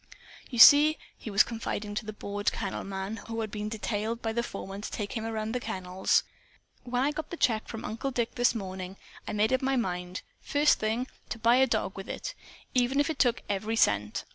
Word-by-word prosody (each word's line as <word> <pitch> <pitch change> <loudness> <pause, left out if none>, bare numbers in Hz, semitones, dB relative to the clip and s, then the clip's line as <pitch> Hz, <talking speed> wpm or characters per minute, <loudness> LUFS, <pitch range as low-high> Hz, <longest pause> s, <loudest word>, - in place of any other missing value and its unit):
"You 245 - -5
see," 295 +6 +9 0.2
he - - -8
was 200 0 +6
confiding 215 -2 -4
to 210 +1 -4
the - - -3
bored 205 0 -2
kennel 200 -4 -4
man 195 +2 -4
who 225 0 -3
had 215 -2 -4
been 210 0 -3
detailed 220 +1 -2
by 225 -2 -2
the 235 - +1
foreman 195 -3 -6
to - - -5
take 205 -2 -4
him 225 - -2
around 220 -1 -2
the 250 - -1
kennels, 190 -5 0 0.6
"when 245 +1 -1
I 290 - +2
got 310 +1 -5
the 345 - -6
check 225 -6 +1
from 225 - -6
Uncle 225 +5 -3
Dick 240 -3 -1
this 245 -1 +2
morning, 190 -2 -5 0.3
I - - -3
made 215 +4 +2
up 260 - +2
my 270 0 +1
mind, 180 -6 -2 0.2
first 295 +1 +3
thing, 220 +3 0 0.2
to - - -3
buy 235 +2 +4
a 265 0 +5
dog 220 -4 -1
with 195 - -8
it, - - -4 0.4
even 255 +2 +2
if 290 +3 +2
it 305 - -7
took 245 -2 +2
every 210 +3 -1
cent. 105 - +2
220 Hz, 215 wpm, -29 LUFS, 200-245 Hz, 0.6 s, see